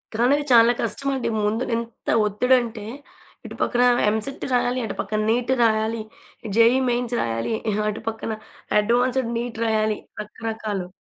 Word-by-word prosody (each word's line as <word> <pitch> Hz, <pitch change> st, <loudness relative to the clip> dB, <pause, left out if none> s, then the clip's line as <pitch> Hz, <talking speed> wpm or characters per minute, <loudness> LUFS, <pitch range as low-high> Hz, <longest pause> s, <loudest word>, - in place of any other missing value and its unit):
కానీవి 265 Hz, +6 st, +3 dB
చాలా 230 Hz, 0 st, +7 dB
కష్టం 275 Hz, -, -3 dB
అండి. 260 Hz, -, -2 dB
ముందు 220 Hz, +4 st, 0 dB
ఎంత 230 Hz, 0 st, -6 dB, 0.2 s
ఒత్తిడంటే, 230 Hz, 0 st, +1 dB, 0.6 s
ఇటు -, -, -8 dB
పక్కన 245 Hz, 0 st, +2 dB, 0.3 s
ఎంసెట్ 220 Hz, +6 st, -3 dB
రాయాలి. 245 Hz, +1 st, +1 dB
అటు -, -, -5 dB
పక్కన 215 Hz, -, -3 dB
నీట్ 245 Hz, +2 st, 0 dB
రాయాలి. 220 Hz, 0 st, +1 dB, 0.6 s
జేఈ 230 Hz, +2 st, +6 dB
మెయిన్స్ 240 Hz, 0 st, -1 dB
రాయాలి. 115 Hz, -, -2 dB, 0.2 s
ఆహ్, 210 Hz, +1 st, -1 dB
అటు 215 Hz, -, -5 dB
పక్కన 225 Hz, 0 st, -5 dB, 0.5 s
అడ్వాన్స్డ్ 240 Hz, +3 st, +1 dB
నీట్ 235 Hz, -1 st, -5 dB
రాయాలి, 215 Hz, -1 st, +1 dB, 0.2 s
రకరకాలు. 210 Hz, -3 st, -5 dB
230 Hz, 135 wpm, -23 LUFS, 215-245 Hz, 0.6 s, చాలా